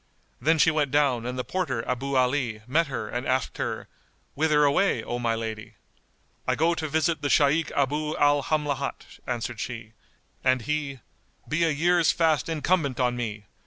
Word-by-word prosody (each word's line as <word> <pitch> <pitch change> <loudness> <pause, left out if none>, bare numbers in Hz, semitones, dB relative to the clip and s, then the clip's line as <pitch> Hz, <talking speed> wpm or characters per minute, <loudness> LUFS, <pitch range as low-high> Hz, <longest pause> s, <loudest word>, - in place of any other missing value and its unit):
Then 160 +5 +3
she 160 +1 +5
went 150 -3 +1
down 130 -4 +2
and 125 +1 -4
the 125 - -1
porter 135 -11 -2
Abu 135 +2 -2
Ali 125 -4 +1
met 155 +6 +2
her 135 - -4
and 125 +1 -4
asked 130 +1 -1
her, - - -3 0.5
"Whither 150 0 +3
away, 145 +8 +2
O 120 - -3
my 115 -1 0
lady?" 110 -1 -6 0.7
"I - - +2
go 165 +3 +2
to 160 -2 -3
visit 160 +2 0
the 145 - -1
Shaykh 150 +4 +3
Abu 150 +2 0
al 145 0 +4
Hamlat;" 150 -1 -3
answered 120 -1 -3
she; 110 -2 -6 0.5
and 130 -2 +2
he, 145 -3 -3 0.5
"Be 155 +3 +1
a - - +2
year's 170 +3 +3
fast 160 -2 +1
incumbent 160 -4 0
on 125 -1 +1
me! 105 -4 -4
140 Hz, 170 wpm, -26 LUFS, 125-155 Hz, 0.7 s, she